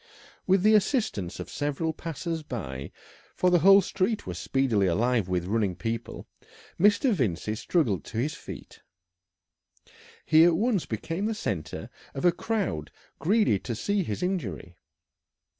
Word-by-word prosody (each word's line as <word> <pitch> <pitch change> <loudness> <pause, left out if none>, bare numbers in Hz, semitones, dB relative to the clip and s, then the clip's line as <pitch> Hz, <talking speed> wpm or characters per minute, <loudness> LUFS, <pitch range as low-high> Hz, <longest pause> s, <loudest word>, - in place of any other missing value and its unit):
With 190 0 +3
the 215 +1 +6
assistance 205 - +1
of - - -5
several 145 +2 -2
passers 165 +1 -4
by 70 - -6 0.4
for 180 - +2
the 175 - +5
whole 195 +3 +7
street 195 +4 -1
was 90 -1 -5
speedily 115 -2 +1
alive 110 +2 +1
with 90 -1 0
running 100 -2 0
people 115 +4 -4 0.5
Mr. 205 +6 +4
Vincey 110 - -1
struggled 110 - 0
to - - -7
his 140 +6 0
feet. - - -10 1.4
He 160 0 +6
at 170 -1 +5
once 210 -1 0
became 165 - -3
the 225 - -1
centre 80 - -4 0.2
of 135 - -2
a 175 - +7
crowd 190 - -2 0.3
greedy 200 - +3
to 120 +2 -5
see 200 - 0
his 110 - -3
injury. 105 - -3
145 Hz, 140 wpm, -27 LUFS, -, 1.4 s, whole